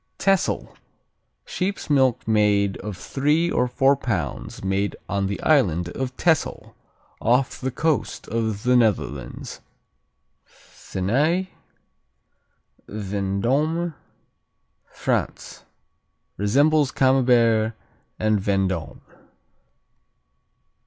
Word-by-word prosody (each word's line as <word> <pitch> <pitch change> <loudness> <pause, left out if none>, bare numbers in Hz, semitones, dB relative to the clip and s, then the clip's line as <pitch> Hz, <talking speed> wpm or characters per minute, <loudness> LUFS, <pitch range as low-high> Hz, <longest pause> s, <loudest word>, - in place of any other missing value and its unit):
Texel 195 -2 0 0.7
Sheep's 195 +2 -3
milk 130 -5 +2
cheese 105 -2 +3
of 105 -2 -6
three 150 - 0
or 125 - +1
four 135 +3 +3
pounds 95 - -4
made 95 +1 -1
on 100 -1 -1
the 100 - -3
island 90 - +2
of 130 +6 -5
Texel, 165 -2 0 0.5
off 125 +3 +1
the 130 - -1
coast 155 +3 -1
of 110 -2 -2
the 125 0 +3
Netherlands. 100 - -1 0.8
Thenay 150 - -2 1.4
Vendôme, 110 - -1 1.0
France - - -3 0.7
Resembles 140 +8 +3
Camembert 120 -5 +3 0.4
and 110 -1 +1
Vendôme. 95 -5 -1
115 Hz, 80 wpm, -23 LUFS, 100-140 Hz, 1.4 s, cheese